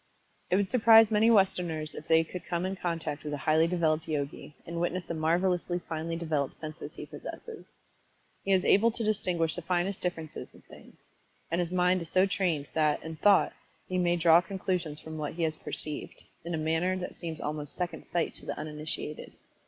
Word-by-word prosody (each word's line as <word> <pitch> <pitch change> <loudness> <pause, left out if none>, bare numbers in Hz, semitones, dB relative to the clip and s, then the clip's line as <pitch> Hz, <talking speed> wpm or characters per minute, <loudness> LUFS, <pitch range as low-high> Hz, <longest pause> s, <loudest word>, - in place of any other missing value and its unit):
It - - +3
would 200 0 +2
surprise 225 -1 +7
many 220 +2 +4
Westerners 180 -7 +2
if 155 - -9
they 160 0 +5
could 180 +2 -8
come 175 0 -1
in 190 +1 -2
contact 165 -5 -3
with 150 -1 -4
a 140 - -9
highly 160 +1 +4
developed 165 -2 +1
Yogi, 145 -1 -4
and 170 0 -4
witness 175 0 -1
the - - -4
marvelously 175 +2 +1
finely 165 -1 -4
developed 155 -5 -2
senses 155 +1 -7
he - - -7
possesses. 460 -2 -9 0.8
He 195 - -1
is 185 -1 +3
able 220 +4 +5
to 230 0 -3
distinguish 175 -7 0
the 175 - -4
finest 180 +3 -1
differences 165 -3 -5
in - - -16
things, - - -17 0.4
and 170 +2 +1
his 170 - -2
mind 180 0 +2
is 165 - -7
so 185 +2 +4
trained 175 -7 0
that, 155 -2 +2
in 160 0 -7
thought, 200 +2 +4 0.3
he 185 0 -1
may 175 -1 +3
draw 170 0 +6
conclusions 180 -4 -2
from 160 0 -8
what 150 -1 -3
he 170 - -1
has 155 -1 0
perceived, 150 -1 -6 0.2
in 170 0 -3
a - - -2
manner 160 +4 0
that 180 - -5
seems 165 -2 -6
almost 150 -1 -2
"second 180 -1 -4
sight" 170 -2 0
to - - -5
the - - -3
uninitiated. 150 0 -5
170 Hz, 195 wpm, -29 LUFS, 155-185 Hz, 0.8 s, surprise